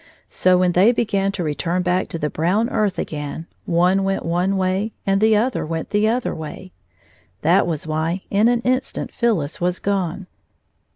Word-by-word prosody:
So, 185 Hz, 0 st, +3 dB
when 180 Hz, 0 st, +3 dB
they 190 Hz, +6 st, +5 dB
began 200 Hz, -5 st, 0 dB
to 185 Hz, -, -3 dB
return 170 Hz, +4 st, -1 dB
back 180 Hz, +1 st, 0 dB
to -, -, -2 dB
the 150 Hz, -2 st, -2 dB
brown 195 Hz, +9 st, +1 dB
earth 210 Hz, -4 st, 0 dB
again, 150 Hz, +1 st, -4 dB, 0.2 s
one 180 Hz, +3 st, +3 dB
went 195 Hz, 0 st, -1 dB
one 180 Hz, +4 st, 0 dB
way 190 Hz, +3 st, 0 dB
and 195 Hz, +1 st, +2 dB
the 220 Hz, -1 st, +5 dB
other 245 Hz, +4 st, 0 dB
went 160 Hz, +1 st, -4 dB
the 210 Hz, +1 st, +2 dB
other 240 Hz, +2 st, 0 dB
way. 160 Hz, +4 st, -8 dB, 0.7 s
That 175 Hz, +4 st, +4 dB
was 160 Hz, -4 st, -3 dB
why 160 Hz, +4 st, -2 dB
in 205 Hz, +3 st, +4 dB
an 240 Hz, -1 st, +2 dB
instant 255 Hz, +2 st, -1 dB
Phyllis 185 Hz, -13 st, -1 dB
was 180 Hz, +1 st, 0 dB
gone. 195 Hz, -1 st, -2 dB
185 Hz, 175 wpm, -21 LUFS, 170-210 Hz, 0.7 s, they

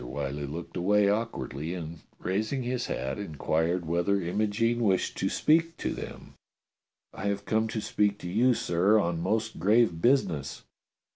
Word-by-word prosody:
Whyllie 70 Hz, +2 st, -4 dB
looked 85 Hz, +4 st, -7 dB
away 100 Hz, +3 st, +3 dB
awkwardly 85 Hz, -, -2 dB
and, 85 Hz, -2 st, -7 dB, 0.2 s
raising 110 Hz, +8 st, -1 dB
his 125 Hz, 0 st, -2 dB
hat, 65 Hz, +5 st, -3 dB
inquired 80 Hz, -1 st, -1 dB
whether 85 Hz, +5 st, +1 dB
Imogene 105 Hz, +6 st, 0 dB
wished 100 Hz, -5 st, +1 dB
to -, -, +1 dB
speak 165 Hz, +1 st, +2 dB
to -, -, -2 dB
them. -, -, -8 dB, 0.8 s
"I 100 Hz, -, -4 dB
have 100 Hz, 0 st, -2 dB
come 110 Hz, 0 st, +1 dB
to 110 Hz, 0 st, -3 dB
speak 105 Hz, -1 st, +1 dB
to -, -, -6 dB
you, 120 Hz, +7 st, +3 dB
sir, 95 Hz, +5 st, +3 dB
on 85 Hz, -4 st, -1 dB
most 110 Hz, +4 st, -1 dB
grave 105 Hz, -2 st, +3 dB
business." 120 Hz, -, +1 dB
100 Hz, 150 wpm, -28 LUFS, 85-110 Hz, 0.8 s, away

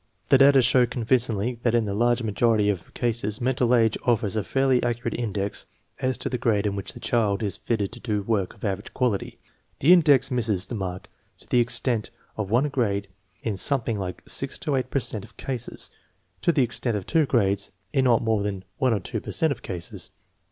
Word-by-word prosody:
The 135 Hz, -, +6 dB
data 135 Hz, -1 st, +7 dB
show 125 Hz, 0 st, +4 dB
convincingly 120 Hz, -1 st, 0 dB
that 120 Hz, -1 st, +2 dB
in 115 Hz, -2 st, +2 dB
the 100 Hz, -, -2 dB
large 120 Hz, +3 st, +2 dB
majority 105 Hz, -1 st, +2 dB
of 90 Hz, -4 st, -7 dB
cases 115 Hz, -3 st, -1 dB
mental 125 Hz, -1 st, +2 dB
age 115 Hz, -2 st, +2 dB
offers 110 Hz, -4 st, +1 dB
a 110 Hz, -, 0 dB
fairly 135 Hz, +1 st, +2 dB
accu 120 Hz, 0 st, -2 dB
rate -, -, -1 dB
index 105 Hz, -4 st, -3 dB, 0.3 s
as 130 Hz, -2 st, 0 dB
to -, -, -4 dB
the 125 Hz, -, -2 dB
grade 110 Hz, -4 st, +1 dB
in 100 Hz, -1 st, 0 dB
which 100 Hz, -, -4 dB
the -, -, -8 dB
child 110 Hz, -3 st, 0 dB
is 100 Hz, -, -1 dB
fitted 105 Hz, -4 st, -2 dB
to 120 Hz, -, -10 dB
do 105 Hz, -4 st, -2 dB
work 100 Hz, -3 st, -1 dB
of -, -, -8 dB
average 100 Hz, +1 st, -4 dB
quality. 125 Hz, -6 st, -1 dB, 0.4 s
The 160 Hz, +6 st, +7 dB
index 145 Hz, -6 st, +5 dB
misses 110 Hz, -7 st, 0 dB
the -, -, -7 dB
mark 95 Hz, -4 st, -4 dB, 0.3 s
to -, -, -16 dB
the 125 Hz, -, +3 dB
extent 120 Hz, -1 st, +1 dB, 0.3 s
of 105 Hz, -3 st, -3 dB
one 125 Hz, +7 st, +2 dB
grade 100 Hz, -7 st, -1 dB, 0.3 s
in 105 Hz, -4 st, -2 dB
something 115 Hz, -2 st, 0 dB
like 90 Hz, -2 st, -5 dB
six -, -, -2 dB
to 145 Hz, -, 0 dB
eight 130 Hz, -1 st, -1 dB
per -, -, -1 dB
cent 115 Hz, -5 st, -2 dB
of -, -, -15 dB
cases, 125 Hz, -3 st, -6 dB, 0.5 s
to -, -, +3 dB
the 145 Hz, -5 st, +3 dB
extent 120 Hz, -1 st, 0 dB
of 95 Hz, -, -6 dB
two 160 Hz, -3 st, +2 dB
grades 100 Hz, -5 st, +1 dB, 0.2 s
in 135 Hz, -2 st, +2 dB
not 120 Hz, -2 st, +4 dB
more 110 Hz, -2 st, +1 dB
than 100 Hz, -2 st, -3 dB, 0.2 s
one 130 Hz, -4 st, +3 dB
or -, -, -1 dB
two 90 Hz, -, -4 dB
per -, -, -7 dB
cent 160 Hz, -2 st, +1 dB
of 135 Hz, -, -4 dB
cases. 90 Hz, -3 st, -5 dB
115 Hz, 215 wpm, -25 LUFS, 100-125 Hz, 0.5 s, data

